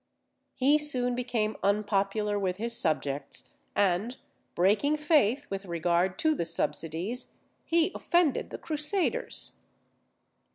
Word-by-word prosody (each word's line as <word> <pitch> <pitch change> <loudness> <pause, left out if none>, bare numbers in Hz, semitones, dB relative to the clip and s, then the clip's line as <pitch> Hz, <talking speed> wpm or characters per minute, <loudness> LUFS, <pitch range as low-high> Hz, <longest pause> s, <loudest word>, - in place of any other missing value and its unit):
He 285 +4 +4
soon 255 -5 +2
became 240 -4 -1
unpopular 205 +1 0
with 185 -2 -1
his 235 +2 -1
subjects; 150 -8 -1 0.3
and 205 +5 +1 0.4
breaking 210 - +3
faith 290 -4 +2
with 195 0 -4
regard 175 +2 0
to 315 - +5
the 285 - -2
subsidies, 165 - -2 0.3
he 335 +1 +2
offended 345 -6 +1
the - - -6
Crusaders. 315 +5 -1
215 Hz, 110 wpm, -28 LUFS, 185-285 Hz, 0.4 s, to